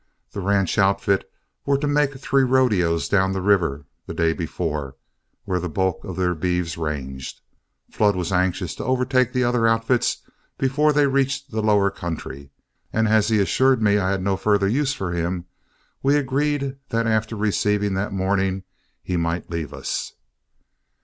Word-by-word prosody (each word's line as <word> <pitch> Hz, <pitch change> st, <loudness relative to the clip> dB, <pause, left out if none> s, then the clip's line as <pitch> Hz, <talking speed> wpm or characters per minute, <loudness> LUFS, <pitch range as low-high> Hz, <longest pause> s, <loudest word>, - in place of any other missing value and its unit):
The 100 Hz, -, -5 dB
ranch 100 Hz, 0 st, +1 dB
outfit 100 Hz, 0 st, +2 dB, 0.3 s
were 140 Hz, 0 st, +2 dB
to 145 Hz, -, -2 dB
make 145 Hz, -2 st, +1 dB
three 135 Hz, 0 st, +1 dB
rodeos 110 Hz, -11 st, +2 dB
down 95 Hz, -1 st, +2 dB
the 95 Hz, -, -2 dB
river 85 Hz, -8 st, +2 dB, 0.2 s
the -, -, -6 dB
day 80 Hz, 0 st, +2 dB
before, 75 Hz, -5 st, -4 dB, 0.5 s
where 95 Hz, -3 st, -1 dB
the 90 Hz, 0 st, -4 dB
bulk 95 Hz, +2 st, -1 dB
of 95 Hz, -4 st, -6 dB
their 90 Hz, -1 st, +1 dB
beeves 90 Hz, 0 st, -1 dB
ranged. 70 Hz, -5 st, -5 dB, 0.5 s
Flood 105 Hz, -2 st, +2 dB
was 90 Hz, -1 st, -2 dB
anxious 90 Hz, -1 st, 0 dB
to -, -, -6 dB
overtake 130 Hz, -1 st, +1 dB
the 125 Hz, 0 st, +1 dB
other 120 Hz, -1 st, +2 dB
outfits 115 Hz, +2 st, +1 dB, 0.3 s
before 145 Hz, +3 st, +2 dB
they 145 Hz, -1 st, +3 dB
reached 135 Hz, 0 st, 0 dB
the 110 Hz, 0 st, -1 dB
lower 105 Hz, -2 st, +3 dB
country, 75 Hz, -6 st, -6 dB, 0.4 s
and 110 Hz, 0 st, +1 dB
as 110 Hz, -1 st, +3 dB
he 110 Hz, -1 st, +2 dB
assured 130 Hz, +6 st, +3 dB
me 105 Hz, -1 st, +3 dB
I 95 Hz, -1 st, 0 dB
had 95 Hz, -1 st, -1 dB
no 95 Hz, 0 st, +1 dB
further 100 Hz, -1 st, +2 dB
use 135 Hz, +6 st, +1 dB
for 95 Hz, -8 st, -3 dB
him, 85 Hz, +1 st, -2 dB, 0.6 s
we 140 Hz, +2 st, +3 dB
agreed 140 Hz, 0 st, 0 dB
that 115 Hz, 0 st, 0 dB
after 110 Hz, 0 st, 0 dB
receiving 105 Hz, -1 st, 0 dB
that 95 Hz, +2 st, -2 dB
morning 95 Hz, 0 st, 0 dB, 0.4 s
he 90 Hz, -, -2 dB
might 85 Hz, +1 st, -2 dB
leave 80 Hz, -4 st, -3 dB
us. -, -, -4 dB
100 Hz, 165 wpm, -22 LUFS, 90-125 Hz, 0.6 s, they